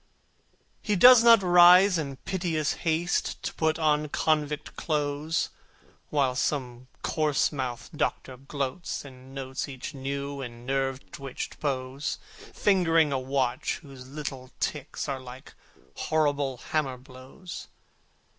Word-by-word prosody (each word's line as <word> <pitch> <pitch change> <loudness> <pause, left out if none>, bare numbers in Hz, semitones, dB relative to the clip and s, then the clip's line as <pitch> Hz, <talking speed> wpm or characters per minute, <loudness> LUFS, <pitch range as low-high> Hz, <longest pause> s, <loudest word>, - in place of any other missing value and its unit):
He 210 - 0
does 245 +4 +9
not 230 -3 +7
rise 180 +1 +7
in 140 -3 -4
piteous 160 +1 -1 0.2
haste 165 +2 0
To - - -3
put 160 0 +1
on 150 -2 +1
convict 150 0 0
clothes, 150 +1 -1 0.6
While 140 -4 +2
some 125 -2 -2 0.2
coarse 155 -3 +1
mouthed 130 +2 -5
Doctor 130 -2 -2
gloats, 140 +4 -4
and 130 0 -13
notes 135 +1 -4
Each 130 +2 -7
new 140 +1 -4
and 120 -2 -8
nerve 135 0 -2
twitched 135 -2 -6
pose, 135 0 -2 0.3
Fingering 165 -6 +3
a 135 - +1
watch 130 -1 -1
whose 135 -3 -12
little 135 -2 -6
ticks 150 0 -3
Are 135 -2 -2
like 130 0 -11 0.4
horrible 145 -4 0
hammer 135 -1 -2
blows. 130 +8 -10
140 Hz, 120 wpm, -27 LUFS, 130-160 Hz, 0.6 s, does